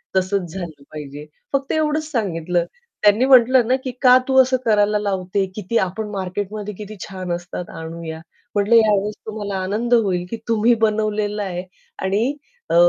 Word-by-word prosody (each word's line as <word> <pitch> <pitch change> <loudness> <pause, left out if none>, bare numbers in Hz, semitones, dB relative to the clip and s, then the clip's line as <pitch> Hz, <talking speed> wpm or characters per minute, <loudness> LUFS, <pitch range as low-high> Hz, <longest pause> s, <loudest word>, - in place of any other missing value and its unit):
तसच 185 -1 0
झालं 165 -7 -7
पाहिजे. 150 -1 -8 0.3
फक्त 275 0 0
एवढंच 310 0 0
सांगितलं 175 - 0 0.4
त्यांनी 210 +5 +5
म्हटलं 255 -2 +6
ना 255 - +3
की 255 - -3
"का 255 -1 +8
तू 265 0 +2
असं 255 0 +2
करायला 210 -1 +3
लावते? 195 -1 -1
किती 215 +2 -1
आपण 210 +3 -1
मार्केटमध्ये 205 +2 -4
किती 210 +1 -8
छान 185 -2 -6
असतात, 175 0 -6
आणूया." 160 0 -7 0.4
म्हटलं, 205 +3 +3
"या 220 -2 +6
वेळेस 210 +2 -2
तुम्हाला 205 -2 -4
आनंद 225 +5 -1
होईल, 190 -6 +2
की 230 - -4
तुम्ही 230 +1 +3
बनवलेलं 210 -1 -1
आहे 180 -2 -4 0.4
आणि 215 +8 +1 0.4
अ, - - +1
205 Hz, 160 wpm, -21 LUFS, 185-230 Hz, 0.4 s, का